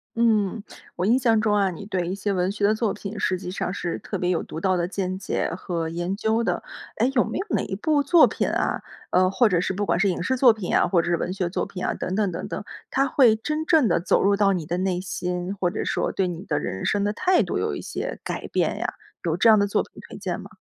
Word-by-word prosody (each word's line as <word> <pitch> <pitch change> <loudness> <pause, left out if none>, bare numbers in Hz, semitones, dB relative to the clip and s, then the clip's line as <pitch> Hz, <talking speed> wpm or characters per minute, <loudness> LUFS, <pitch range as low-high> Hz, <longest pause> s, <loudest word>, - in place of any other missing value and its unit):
嗯， 220 -2 +2 0.4
我 180 - 0
印 230 +5 +4
象 230 -4 +3
中 215 -1 +2
啊， 200 -2 +3
你 175 +3 -8
对 185 -3 -2
一 - - -2
些 200 +1 -2
文 185 0 0
学 205 0 0
的 215 +2 +3
作 220 -2 0
品 205 +1 -7
实 185 - 0
际 180 0 -7
上 180 0 -3
是 175 -3 -3
特 - - -5
别 180 - 0
有 180 - 0
独 160 - -7
到 185 +2 +1
的 175 -1 0
见 185 0 -3
解 190 - -2
和 170 -2 -3
研 175 +4 -3
究 220 +2 +1
的。 - - -1 0.3
诶， 235 +4 +3
有 245 - +5
没 - - -4
有 385 - -2
哪 - - +1
一 - - -4
部 290 +5 +2
作 325 +4 +6
品 - - -1
啊 - - 0 0.3
呃， 185 0 +4
或 235 +4 +4
者 180 -5 +2
是 180 - -1
不 205 +2 -2
管 170 -2 +1
是 200 - +3
影 180 - -2
视 260 +9 0
作 255 -1 +6
品 215 -5 -2
啊， - - +4
或 175 -2 +3
者 170 - -3
是 - - +4
文 175 - -3
学 185 -2 -2
作 175 - -2
品 180 -2 -6
啊， - - 0
等 185 - -4
等 205 0 +1
等 165 - -5
等， - - -4 0.3
它 275 +1 +2
会 250 -5 +5
真 305 +7 -2
正 315 -6 +4
地 170 - +2
走 - - +2
入 200 +1 +4
到 200 -1 +3
你 180 -5 -2
的 175 +3 -2
内 185 -1 0
心， 180 0 -3
或 180 -2 0
者 205 - -3
说 - - 0
对 190 - 0
你 175 0 -5
的 150 -6 -1
人 95 0 -4
生 205 0 +1
的 205 - 0
态 365 +9 +3
度 - - -2
有 - - -1
一 - - -5
些 - - -5
改 - - -4
变 - - 0
呀， - - -2 0.3
有 165 -1 0
这 230 - +4
样 220 -1 +8
的 200 - +3
作 200 - +1
品 - - -11
推 - - -10
荐 - - -4
吗？ - - -12
195 Hz, 300 characters per minute, -24 LUFS, 180-220 Hz, 0.4 s, 样